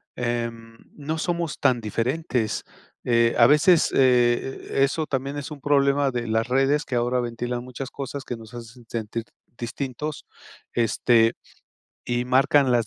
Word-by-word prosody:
em, 115 Hz, -1 st, -4 dB, 0.2 s
no 155 Hz, +2 st, -4 dB
somos 170 Hz, -1 st, -2 dB
tan 125 Hz, -2 st, +2 dB
diferentes, 115 Hz, +1 st, -1 dB, 0.4 s
eh, 115 Hz, -1 st, +3 dB
a 115 Hz, -, +7 dB
veces, 155 Hz, +4 st, +5 dB
eh, 125 Hz, 0 st, +2 dB, 0.2 s
eso 155 Hz, +3 st, 0 dB
también 140 Hz, +1 st, -3 dB
es 145 Hz, +1 st, -6 dB
un 145 Hz, -3 st, -8 dB
problema 140 Hz, -1 st, +2 dB
de 120 Hz, -1 st, -3 dB
las 110 Hz, +1 st, 0 dB
redes 135 Hz, +4 st, +2 dB
que 125 Hz, -, -3 dB
ahora 120 Hz, +1 st, +1 dB
ventilan 120 Hz, 0 st, -3 dB
muchas 130 Hz, +1 st, -7 dB
cosas 140 Hz, 0 st, -6 dB
que 120 Hz, -, -5 dB
nos 110 Hz, +1 st, -13 dB
hacen 120 Hz, 0 st, -11 dB
sentir 115 Hz, 0 st, -4 dB, 0.3 s
distintos, 140 Hz, +5 st, -5 dB, 0.5 s
este, 115 Hz, 0 st, +3 dB, 0.8 s
y 120 Hz, 0 st, 0 dB
marcan 135 Hz, +1 st, +3 dB
las 120 Hz, -3 st, +2 dB
125 Hz, 145 wpm, -24 LUFS, 120-140 Hz, 0.8 s, a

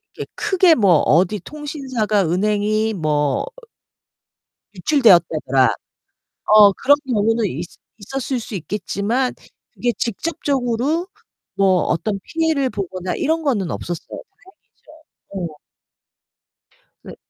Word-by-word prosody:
이렇게 -, -, -8 dB
크게 380 Hz, -5 st, +3 dB
뭐 195 Hz, -, +4 dB
어디 185 Hz, +6 st, +2 dB
통신사가 260 Hz, -, -2 dB
은행이 210 Hz, +4 st, 0 dB
뭐 150 Hz, -5 st, 0 dB, 1.3 s
유출되었다더라. 170 Hz, -, +3 dB, 0.8 s
어 205 Hz, -2 st, +8 dB
그런 285 Hz, +8 st, +3 dB
경우는 225 Hz, -1 st, +1 dB
있 170 Hz, -2 st, -4 dB, 0.3 s
있었을 260 Hz, +4 st, -4 dB
수 225 Hz, -2 st, -7 dB
있겠지만 210 Hz, -, -2 dB, 0.4 s
그게 245 Hz, -, -1 dB
직접적으로 275 Hz, -, -1 dB, 0.5 s
뭐 190 Hz, -3 st, +3 dB
어떤 200 Hz, +3 st, -1 dB
피해를 320 Hz, -5 st, 0 dB
보거나 185 Hz, -4 st, -4 dB
이런거는 280 Hz, -, 0 dB
없었어요. 175 Hz, -1 st, -6 dB, 0.3 s
다행이죠. 305 Hz, -, -11 dB
네. 150 Hz, -, -19 dB, 1.4 s
네. -, -, -11 dB
215 Hz, 235 characters per minute, -20 LUFS, 185-270 Hz, 1.4 s, 어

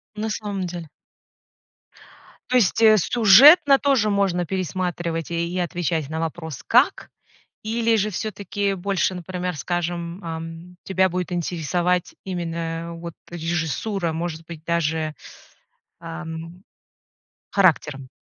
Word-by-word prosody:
На 215 Hz, +1 st, -3 dB
самом 205 Hz, -3 st, -3 dB
деле. 170 Hz, -2 st, -7 dB, 1.6 s
То 255 Hz, -, +1 dB
есть, 230 Hz, -3 st, +3 dB
э, 215 Hz, -1 st, +7 dB
сюжетно 270 Hz, -, +7 dB
тоже 265 Hz, -7 st, +2 dB
можно 195 Hz, -3 st, +1 dB
пересматривать 175 Hz, -2 st, -3 dB
и 170 Hz, 0 st, -1 dB
и 185 Hz, -, -1 dB
отвечать 170 Hz, -4 st, -2 dB
на 160 Hz, +1 st, -3 dB
вопрос: 160 Hz, -3 st, -5 dB
"Как?" -, -, +3 dB, 0.5 s
Или 225 Hz, +1 st, +1 dB
же 210 Hz, 0 st, +1 dB
всё-таки 200 Hz, 0 st, -2 dB
больше, 190 Hz, -1 st, 0 dB
например, 180 Hz, -1 st, -4 dB
скажем, 175 Hz, +2 st, -3 dB
эм, 165 Hz, +2 st, -7 dB
тебя 190 Hz, 0 st, +2 dB
будет 180 Hz, -1 st, -3 dB
интересовать 175 Hz, +1 st, -1 dB
именно, 170 Hz, -2 st, -4 dB
вот, 170 Hz, 0 st, -7 dB, 0.2 s
режиссура, 170 Hz, +2 st, -2 dB
может 165 Hz, 0 st, -4 dB
быть 165 Hz, -2 st, -9 dB
даже, 160 Hz, -2 st, 0 dB, 0.9 s
эм, 165 Hz, +1 st, -8 dB, 0.9 s
характером. 150 Hz, -8 st, +2 dB
175 Hz, 110 wpm, -23 LUFS, 165-195 Hz, 1.6 s, э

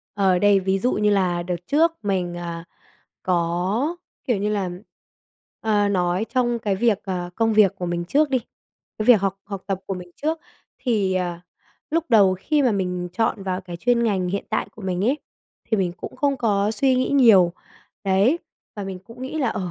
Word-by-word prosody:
Ờ, 190 Hz, -3 st, +3 dB
đây, 205 Hz, 0 st, +4 dB
ví 190 Hz, +1 st, 0 dB
dụ 245 Hz, +6 st, +1 dB
như 210 Hz, 0 st, +2 dB
là 180 Hz, -4 st, +1 dB
đợt 175 Hz, 0 st, -2 dB
trước 320 Hz, +3 st, +3 dB
mình, 185 Hz, -3 st, -1 dB
à, 170 Hz, -1 st, -5 dB, 0.6 s
có, 185 Hz, -, 0 dB, 0.3 s
kiểu 245 Hz, -, +1 dB
như 205 Hz, +2 st, -1 dB
là 200 Hz, -4 st, -1 dB, 0.9 s
ờ, 210 Hz, -2 st, +2 dB
nói 180 Hz, 0 st, +1 dB
trong 240 Hz, 0 st, 0 dB
cái 205 Hz, -4 st, -1 dB
việc, 220 Hz, -1 st, +2 dB
ờ, 180 Hz, -2 st, -3 dB
công 225 Hz, +2 st, +1 dB
việc 210 Hz, -3 st, +5 dB
của 180 Hz, -, -4 dB
mình 175 Hz, 0 st, -2 dB
trước 290 Hz, -, +2 dB
đi 260 Hz, -, +3 dB, 0.6 s
cái 215 Hz, -, -2 dB
việc 240 Hz, -5 st, +7 dB
học 195 Hz, 0 st, -1 dB
học 200 Hz, -2 st, -6 dB
tập 195 Hz, -2 st, -1 dB
của 195 Hz, -, -2 dB
mình 180 Hz, -1 st, -9 dB
trước. 320 Hz, +2 st, 0 dB, 0.4 s
Thì, 205 Hz, -7 st, 0 dB
ờ, 175 Hz, -2 st, -2 dB, 0.5 s
lúc 330 Hz, +1 st, +1 dB
đầu 200 Hz, -5 st, +6 dB
khi 300 Hz, +6 st, +1 dB
mà 250 Hz, -4 st, +3 dB
mình 180 Hz, -2 st, -2 dB
chọn 225 Hz, 0 st, 0 dB
vào 185 Hz, -1 st, -2 dB
cái 180 Hz, -2 st, -8 dB
chuyên 235 Hz, +6 st, +2 dB
ngành 190 Hz, -5 st, 0 dB
hiện 200 Hz, +2 st, -2 dB
tại -, -, -1 dB
của 220 Hz, -, -13 dB
mình 185 Hz, 0 st, -1 dB
ấy, 265 Hz, +6 st, +2 dB, 0.5 s
thì 220 Hz, -, +3 dB
mình 185 Hz, -3 st, 0 dB
cũng -, -, -9 dB
không 280 Hz, +1 st, +1 dB
có 205 Hz, -4 st, +1 dB
suy 265 Hz, +3 st, +2 dB
nghĩ 255 Hz, -, 0 dB
nhiều, 220 Hz, -11 st, +6 dB, 0.5 s
đấy, 200 Hz, -, +3 dB, 0.4 s
và 205 Hz, -, -4 dB
mình 190 Hz, -1 st, -5 dB
cũng 235 Hz, +2 st, -11 dB
nghĩ 270 Hz, +4 st, -4 dB
là, 265 Hz, -5 st, +1 dB
ờ, 185 Hz, -5 st, -3 dB
200 Hz, 200 wpm, -23 LUFS, 185-235 Hz, 0.9 s, việc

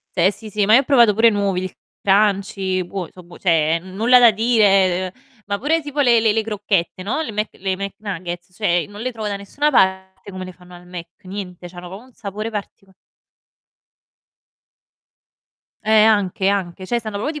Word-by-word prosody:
Cioè 180 Hz, +2 st, +4 dB
sì, 215 Hz, +1 st, -10 dB
sì, 205 Hz, 0 st, 0 dB
ma 215 Hz, -, +5 dB
io 260 Hz, -, +8 dB
ho -, -, -2 dB
provato 240 Hz, -7 st, +4 dB
pure 230 Hz, +2 st, +5 dB
i -, -, +4 dB
nuovi, 200 Hz, -3 st, -1 dB
il 185 Hz, -, -6 dB, 0.3 s
crunchy, 195 Hz, -2 st, +1 dB
buon 180 Hz, -1 st, -5 dB
so' 180 Hz, -, -14 dB
buon 175 Hz, 0 st, -15 dB
cioè 165 Hz, -2 st, +2 dB
n 185 Hz, +2 st, -12 dB
nulla 235 Hz, +5 st, +5 dB
da 240 Hz, -1 st, +7 dB
dire, 195 Hz, -5 st, +2 dB
uhm, 250 Hz, -3 st, -29 dB
ma 200 Hz, 0 st, -2 dB
pure 315 Hz, +7 st, +1 dB
tipo 290 Hz, -1 st, -4 dB
le 235 Hz, -3 st, +4 dB
le 220 Hz, -2 st, +3 dB
le 220 Hz, 0 st, +1 dB
crocchette, 200 Hz, -4 st, -2 dB
no, 245 Hz, +11 st, -2 dB
le 230 Hz, -, -5 dB
Mc 210 Hz, +1 st, -1 dB
le 190 Hz, 0 st, -3 dB
Mc 200 Hz, 0 st, -5 dB
Nuggets, 180 Hz, -3 st, -6 dB
cioè 175 Hz, -5 st, +1 dB
non 205 Hz, -, -10 dB
le 255 Hz, +3 st, -2 dB
trovo 220 Hz, -3 st, -5 dB
da 200 Hz, -, -3 dB
nessuna 285 Hz, +10 st, -1 dB
parte 190 Hz, -3 st, 0 dB
come 185 Hz, -1 st, -7 dB
le 185 Hz, -, -9 dB
fanno 180 Hz, 0 st, -17 dB
al 175 Hz, 0 st, -14 dB
Mc, 175 Hz, -1 st, -8 dB, 0.2 s
niente, 185 Hz, -2 st, -8 dB
c'hanno 175 Hz, 0 st, -10 dB
proprio 195 Hz, +4 st, -10 dB
un 260 Hz, -, -20 dB
sapore 215 Hz, 0 st, -6 dB
partico 200 Hz, -2 st, -8 dB, 2.9 s
Eh, 215 Hz, -, -1 dB
anche, 200 Hz, -3 st, +2 dB
anche, 190 Hz, -2 st, -1 dB
cioè 240 Hz, +4 st, -1 dB
stanno 215 Hz, -2 st, -6 dB
proprio 300 Hz, +7 st, -3 dB
200 Hz, 200 wpm, -20 LUFS, 185-220 Hz, 2.9 s, io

